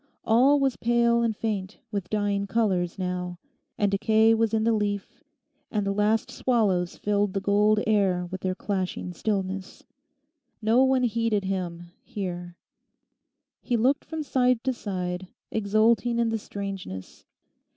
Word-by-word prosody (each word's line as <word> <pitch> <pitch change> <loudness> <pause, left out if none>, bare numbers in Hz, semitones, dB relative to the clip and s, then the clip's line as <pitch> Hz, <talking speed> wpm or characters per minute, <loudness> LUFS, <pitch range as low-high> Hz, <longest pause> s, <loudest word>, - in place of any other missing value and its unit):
All 260 +6 +5
was 270 -2 +1
pale 235 0 +3
and 225 -2 0
faint 205 -3 -3
with 200 -4 -3
dying 205 -1 0
colours 190 -6 0
now; 180 -1 -3 0.4
and 205 -1 +1
decay 220 +2 +4
was 225 -1 +2
in 220 -1 +1
the 230 +1 +3
leaf, 205 - -2 0.5
and 210 -2 -1
the 200 - 0
last 210 +2 +1
swallows 200 -8 +1
filled 205 -1 0
the 195 - 0
gold 210 +2 +3
air 195 -4 +2
with 185 +1 -7
their 185 -1 -1
clashing 185 -2 -3
stillness. 195 0 -3 0.8
No 230 +4 +4
one 265 -1 +3
heeded 230 -3 +1
him 175 -3 -4
here. 175 -3 -6 1.0
He 240 - 0
looked 265 +5 +2
from 320 -1 -5
side 250 -4 +2
to 265 -1 +1
side, 185 -4 -4 0.2
exulting 220 +2 +2
in 235 -1 +2
the 225 0 -1
strangeness. 195 - -7
205 Hz, 140 wpm, -26 LUFS, 190-230 Hz, 1.0 s, All